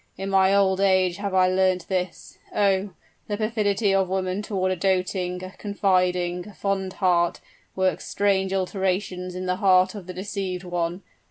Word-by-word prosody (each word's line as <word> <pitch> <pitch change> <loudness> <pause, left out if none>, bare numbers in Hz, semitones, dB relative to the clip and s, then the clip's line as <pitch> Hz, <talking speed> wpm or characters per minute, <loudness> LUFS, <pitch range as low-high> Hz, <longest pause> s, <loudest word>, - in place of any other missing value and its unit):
In 195 +1 -4
my 190 0 +4
old 190 -1 +3
age 185 -2 +3
have 200 -1 -3
I 185 -1 +5
learnt 185 -1 +1
this! 185 -2 -4 0.2
Oh! 200 -1 +2 0.4
the 205 - -2
perfidy 210 -2 +1
of 190 -1 +2
women 190 +1 -1
toward 190 -3 -1
a - - 0
doting 185 0 -1
a 185 - -7
confiding 180 -3 0
a 210 - -12
fond 195 -2 -2
heart, 175 -3 +1 0.4
works 190 0 0
strange 195 -1 +1
alterations 185 -1 -2
in 185 0 -4
the 180 0 0
heart 185 -2 +4
of 200 -4 -9
the 185 - -6
deceived 190 -1 -4
one! 175 +1 -3
190 Hz, 165 wpm, -24 LUFS, 185-195 Hz, 0.4 s, I